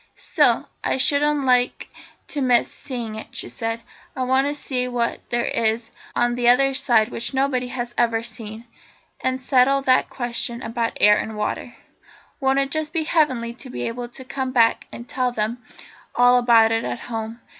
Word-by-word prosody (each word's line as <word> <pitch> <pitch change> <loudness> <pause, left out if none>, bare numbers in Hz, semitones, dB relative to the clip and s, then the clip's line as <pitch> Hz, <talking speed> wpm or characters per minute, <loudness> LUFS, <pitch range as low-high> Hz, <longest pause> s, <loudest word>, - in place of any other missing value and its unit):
"Still, - - +2 0.2
I - - 0
shouldn't 290 +2 +2
like 250 -1 +2 0.4
to 290 - -2
miss 245 -2 +3
seeing 240 -5 -5
it," 220 - -9
she - - -3
said. 225 0 -3 0.3
"I 260 - -2
want 260 +2 +2
to 290 - -2
see 255 -3 -2
what 240 -2 -1
there 240 0 0
is 225 0 0 0.2
on 240 0 +2
that 240 0 0
other 270 +3 +5
side 240 -5 +2
which 240 +3 -1
nobody 265 -2 +1
has 245 -1 -5
ever 230 -1 +2
seen 220 -1 -7
yet, 240 - -23 0.6
and 260 0 0
settle 265 +1 +3
that 255 -1 +3
question 240 -1 -3
about 230 0 -2
air 210 0 +6
and 220 -1 -5
water. 225 +3 -3 0.6
Won't 270 0 +2
it 275 0 0
just 310 0 -2
be 325 -2 0
heavenly 260 -8 +1
to 255 +2 -10
be - - -5
able 240 +1 -5
to 260 +2 -10
come 260 0 -3
back 230 -3 +3
and 235 - -9
tell 255 -1 -1
them 230 +1 -2 0.5
all 245 0 +5
about 230 -2 +5
it 225 0 0
at - - -3
home? 225 0 -5
245 Hz, 185 wpm, -22 LUFS, 230-265 Hz, 0.6 s, air